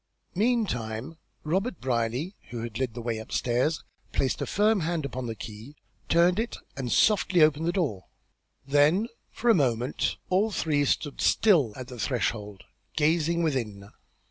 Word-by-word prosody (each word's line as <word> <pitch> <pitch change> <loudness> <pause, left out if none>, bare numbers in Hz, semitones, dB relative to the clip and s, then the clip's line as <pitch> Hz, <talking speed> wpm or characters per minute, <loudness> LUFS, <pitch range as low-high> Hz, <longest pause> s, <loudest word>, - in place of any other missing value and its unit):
Meantime 165 - -1 0.3
Robert 185 +6 -1
Brierly, 125 - -1 0.2
who 120 -1 -5
had 115 -1 -5
led 125 -4 -2
the 120 - -6
way 115 -2 -2
upstairs, 125 +7 0 0.3
placed 130 - 0
a - - -2
firm 210 +1 +3
hand 165 -2 -1
upon 130 -2 -4
the 115 - -4
key, 110 +7 -9 0.3
turned 175 +3 +4
it 230 +1 -2 0.2
and 130 -3 -4
softly 190 -5 +4
opened 155 +1 +3
the - - +3
door. 145 - -1 0.6
Then, 150 - +3 0.2
for 240 - +2
a - - +6
moment, 125 - 0
all 195 +4 +3
three 150 -8 +1
stood 145 +1 -1
still 165 - +4
at 130 -1 -7
the 125 -2 -9
threshold, 105 -4 -2 0.3
gazing 165 +2 +2
within. 110 -10 -2
145 Hz, 150 wpm, -27 LUFS, 120-175 Hz, 0.6 s, a